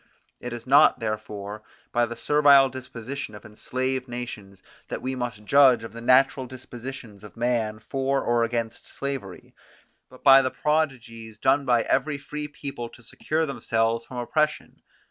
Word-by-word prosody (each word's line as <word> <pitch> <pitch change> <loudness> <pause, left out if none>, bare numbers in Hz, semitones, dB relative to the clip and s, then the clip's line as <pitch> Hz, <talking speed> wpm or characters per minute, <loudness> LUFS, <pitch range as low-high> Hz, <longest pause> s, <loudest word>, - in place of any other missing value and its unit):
It 125 - -6
is 120 -1 -7
not 140 +1 +6
therefore 105 -2 -5 0.3
by 120 0 +2
the 120 - -6
servile 140 +1 +5
disposition 130 -1 -7
of 105 - -12
enslaved 130 +4 -3
nations 105 -6 -7 0.2
that - - -4
we 130 +1 -2
must 120 -4 -5
judge 130 -2 +5
of 115 - -8
the 115 - -8
natural 130 +1 +3
dispositions 125 -3 -9
of 105 - -13
man 115 -3 0
for 135 +4 -1
or 120 0 +2
against 115 -1 -3
slavery, 135 -10 -6 0.6
but 130 - -17
by 135 -1 +8
the 130 - 0
prodigies 125 -8 -2
done 135 +4 +2
by 120 -3 +3
every 145 +2 0
free 150 +1 -6
people 140 -5 -7
to 120 - -17
secure 160 +7 -2
themselves 115 -5 0
from 125 - -10
oppression. 150 +5 -1
125 Hz, 155 wpm, -25 LUFS, 115-135 Hz, 0.6 s, by